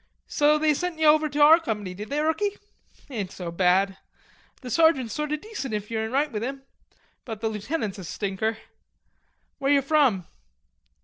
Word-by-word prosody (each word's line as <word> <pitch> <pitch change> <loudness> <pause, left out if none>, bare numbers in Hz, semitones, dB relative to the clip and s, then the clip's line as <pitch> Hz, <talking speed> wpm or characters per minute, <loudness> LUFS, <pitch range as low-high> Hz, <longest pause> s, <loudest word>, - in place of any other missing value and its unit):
so 300 0 +3
they 305 0 +3
sent 355 +2 -3
ye 315 - +1
over 305 0 +5
to 290 +1 -4
our 310 +3 +8
company, 210 - -4
did 210 +3 -8
they, 290 - -1
rookie? 400 +7 0 0.5
Ain't 205 -7 -4
so 175 -2 -6
bad. 190 +2 +2 0.6
The 250 -2 -7
sergeant's 275 -8 +3
sort 300 0 -3
o' - - +2
decent 305 - -5
if 210 +1 -5
yo're 220 -1 -1
in 220 - -6
right 285 +3 +1
with 210 -3 -3
him, 270 +3 -5 0.6
but 225 -4 -7
the 225 0 -1
lieutenant's 215 -1 -3
a - - -7
stinker.... 200 +5 -2 1.0
Where 275 0 +1
you 280 -1 +4
from?" 275 - +2
265 Hz, 180 wpm, -25 LUFS, 210-305 Hz, 1.0 s, our